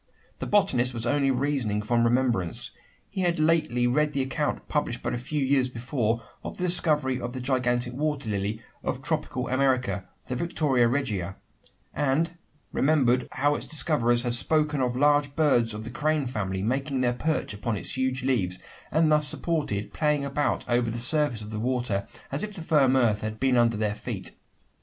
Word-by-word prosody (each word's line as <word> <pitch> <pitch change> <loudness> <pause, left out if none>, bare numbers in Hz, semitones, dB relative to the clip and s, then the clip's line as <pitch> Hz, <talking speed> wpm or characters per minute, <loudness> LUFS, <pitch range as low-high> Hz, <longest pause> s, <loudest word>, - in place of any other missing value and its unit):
The - - -4
botanist 130 -12 +2
was 115 0 -1
only 140 +2 +2
reasoning 130 -6 0
from 115 +2 +2
remembrance. 120 -7 +1 0.4
He 190 - -4
had 175 -1 +1
lately 155 -6 +2
read 150 +5 +2
the 135 -2 +1
account 145 +3 -2
published 145 -6 -2
but - - -1
a - - -1
few 140 +3 -2
years 130 -1 +3
before 115 -2 -1 0.2
of - - -6
the 180 - -3
discovery 150 -7 +2
of 120 0 -4
the 130 - -4
gigantic 125 -1 0
water 145 -2 -2
lily 105 +3 -2 0.2
of 130 - -3
tropical 150 -4 -2
America 130 -6 +1 0.2
the 125 - -3
Victoria 135 -5 +2
Regia 105 -9 -1 0.6
and 150 +4 +1 0.4
remembered 130 -4 +2
how 145 +2 +2
its - - -3
discoverers 125 -7 +2
had 120 -2 +1
spoken 150 +3 +2
of 125 -1 0
large 145 +1 +3
birds 130 -7 +3
of 105 0 -6
the 115 - -7
crane 150 +2 0
family 95 -6 -3
making 135 +3 -1
their 125 -1 +2
perch 155 -1 -1
upon 105 +1 -2
its - - -2
huge 130 0 -1
leaves, 100 -9 +1 0.3
and 160 0 +3
thus 150 -1 +4
supported, 145 -12 -1
playing 150 -2 +1
about 140 +1 -1
over 120 -1 +1
the 115 - -3
surface 130 -2 +1
of 105 - -8
the 105 - -4
water, 120 -4 -1 0.2
as 140 - -2
if 210 -1 -4
the 170 - -6
firm 140 -5 +4
earth 115 -5 +3
had 110 0 -4
been 135 -1 +2
under 120 -2 +3
their 105 -1 0
feet. 105 - -4
130 Hz, 180 wpm, -26 LUFS, 120-150 Hz, 0.6 s, thus